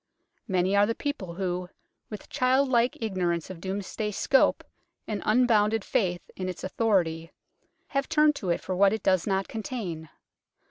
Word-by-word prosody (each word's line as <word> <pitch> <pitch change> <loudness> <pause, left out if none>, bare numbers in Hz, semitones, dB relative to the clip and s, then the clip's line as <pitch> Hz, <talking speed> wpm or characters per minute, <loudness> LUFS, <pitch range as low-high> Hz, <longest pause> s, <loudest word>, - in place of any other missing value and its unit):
Many 185 -1 +1
are 205 0 +5
the 230 - -1
people 200 - -4
who, 180 -1 -3 0.4
with 210 -2 -8
child 260 +2 +2
like 240 -1 +2
ignorance 180 -6 -1
of 170 -3 -10
Domesday's 200 +2 -4
scope 270 - +3 0.4
and 210 -2 -3
unbounded 220 -2 +3
faith 180 -5 -1
in 185 -1 -3
its 180 - -7
authority, 180 -6 0 0.6
have 275 -1 -1
turned 305 -1 +4
to 185 - -4
it 170 - 0
for 185 - -3
what 195 +2 +4
it 220 - -3
does 185 -1 +2
not 195 -1 0
contain. 200 - -5
200 Hz, 155 wpm, -27 LUFS, 180-230 Hz, 0.6 s, are